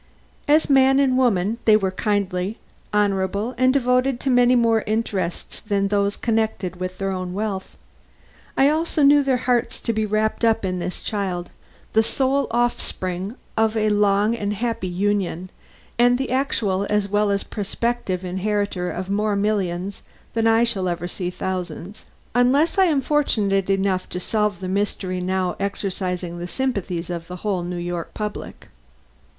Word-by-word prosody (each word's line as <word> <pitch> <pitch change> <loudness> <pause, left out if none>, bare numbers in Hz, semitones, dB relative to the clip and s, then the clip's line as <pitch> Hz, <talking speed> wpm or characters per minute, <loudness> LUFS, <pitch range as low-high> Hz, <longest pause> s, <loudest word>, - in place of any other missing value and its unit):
As 305 +2 +4
man 270 -1 +5
and 265 -2 +3
woman 230 -4 +2
they 215 -1 +7
were 190 -3 -1
kindly, 200 0 -1 0.3
honorable 205 +2 0
and 255 +1 +4
devoted 255 -1 +2
to 270 - 0
many 245 0 +5
more 230 -2 +3
interests 205 -5 -2
than 200 -2 0
those 200 0 +1
connected 220 -5 -1
with 185 0 -5
their 195 0 -2
own 185 -1 -4
wealth. 200 -2 -4 0.8
I 270 - +5
also 315 0 +1
knew 290 +1 +7
their 270 -2 +1
hearts 245 -2 +1
to 230 - -1
be 215 0 0
wrapped 215 +2 0
up 225 -2 +3
in 185 -1 -2
this 180 +1 -5
child, 185 -4 -3 0.4
the 220 - +5
sole 270 +4 +1
offspring 205 -4 -2 0.2
of 220 0 +2
a 215 0 +2
long 205 +2 +3
and 205 -2 -2
happy 230 -3 -2
union, 185 -1 -1 0.5
and 245 +1 +5
the 265 -1 -3
actual 210 -7 0
as 210 -1 +1
well 205 +1 +1
as 200 0 0
prospective 205 -2 -2
inheritor 190 0 -1
of 185 +1 -4
more 205 +1 0
millions 200 -2 -1 0.3
than 225 0 +2
I 225 +1 +4
shall 195 -6 0
ever 175 0 -3
see 180 0 -3
thousands, 180 +1 -5 0.3
unless 275 - +3
I 380 - +6
am 300 -6 +2
fortunate 210 -10 +1
enough 195 -1 0
to 180 - -4
solve 210 -1 -1
the 185 - -4
mystery 190 -1 -1
now 185 0 -1
exercising 185 -3 -3
the 175 - -4
sympathies 185 -8 -2
of 170 -1 -5
the 180 - -7
whole 195 -4 0
New 175 0 -4
York 175 -1 -4
public. 210 -1 -6
205 Hz, 160 wpm, -22 LUFS, 185-235 Hz, 0.8 s, they